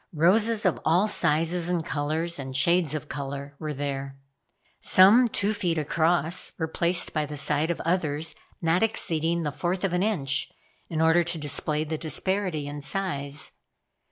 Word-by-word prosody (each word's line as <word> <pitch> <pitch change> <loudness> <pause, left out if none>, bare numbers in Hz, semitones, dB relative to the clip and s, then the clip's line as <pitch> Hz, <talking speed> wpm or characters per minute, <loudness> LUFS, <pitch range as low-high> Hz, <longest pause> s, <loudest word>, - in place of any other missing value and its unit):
Roses 210 +7 +3
of 185 - +2
all 175 +6 +3
sizes 165 -1 +1
and 170 -3 -1
colors 155 +3 -2
and 130 -1 -4
shades 165 +1 +3
of 155 0 -5
color 140 0 -6
were 155 -1 -4
there. 140 -1 -4 0.6
Some 210 +7 +6
two 210 -1 -1
feet 175 -5 -1
across 160 +2 +1
were 160 - -2
placed 170 +2 +1
by 155 -2 -1
the 150 +1 -6
side 150 +3 0
of 170 - -2
others 160 -2 -1 0.3
not 165 +2 +2
exceeding 170 -6 0
the 150 - -2
fourth 180 +5 -3
of 190 -3 0
an 180 - +1
inch 140 -10 -1 0.4
in 160 -1 -2
order 165 +1 +4
to 175 0 -3
display 150 0 -1
the 155 0 -4
disparity 180 -1 -2
in 145 0 -6
size. 145 -4 -2
160 Hz, 160 wpm, -26 LUFS, 150-180 Hz, 0.6 s, Some